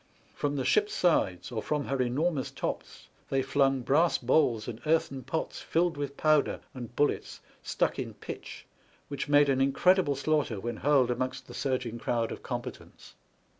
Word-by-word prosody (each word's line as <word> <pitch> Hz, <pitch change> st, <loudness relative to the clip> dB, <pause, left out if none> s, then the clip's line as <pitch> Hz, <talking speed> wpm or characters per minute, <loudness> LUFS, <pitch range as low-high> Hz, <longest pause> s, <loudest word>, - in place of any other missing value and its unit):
From 145 Hz, 0 st, -2 dB
the 135 Hz, -, -2 dB
ship's 420 Hz, 0 st, +2 dB
sides, 95 Hz, -, +1 dB
or 110 Hz, -2 st, -2 dB
from 150 Hz, +2 st, -1 dB
her 135 Hz, -1 st, -1 dB
enormous 135 Hz, +4 st, 0 dB
tops, -, -, -5 dB, 0.2 s
they 135 Hz, -1 st, +1 dB
flung 135 Hz, -1 st, +2 dB
brass 150 Hz, +7 st, +3 dB
balls 120 Hz, -4 st, +2 dB
and 120 Hz, -1 st, -6 dB
earthen 155 Hz, -4 st, +1 dB
pots 160 Hz, +6 st, -4 dB
filled 170 Hz, 0 st, +1 dB
with 140 Hz, -1 st, -5 dB
powder 155 Hz, -2 st, +2 dB
and 120 Hz, -2 st, -8 dB
bullets 145 Hz, -, 0 dB, 0.2 s
stuck -, -, -1 dB
in -, -, -5 dB
pitch, -, -, -8 dB, 0.4 s
which 140 Hz, 0 st, -4 dB
made 145 Hz, 0 st, +6 dB
an 135 Hz, -1 st, +2 dB
incredible 145 Hz, +3 st, +3 dB
slaughter 140 Hz, -6 st, 0 dB
when 120 Hz, +4 st, -4 dB
hurled 135 Hz, -3 st, +3 dB
amongst 130 Hz, +2 st, -3 dB
the -, -, -11 dB
surging 125 Hz, -3 st, -2 dB
crowd 115 Hz, -1 st, -1 dB
of -, -, -7 dB
combatants. -, -, -7 dB
135 Hz, 165 wpm, -29 LUFS, 125-150 Hz, 0.4 s, made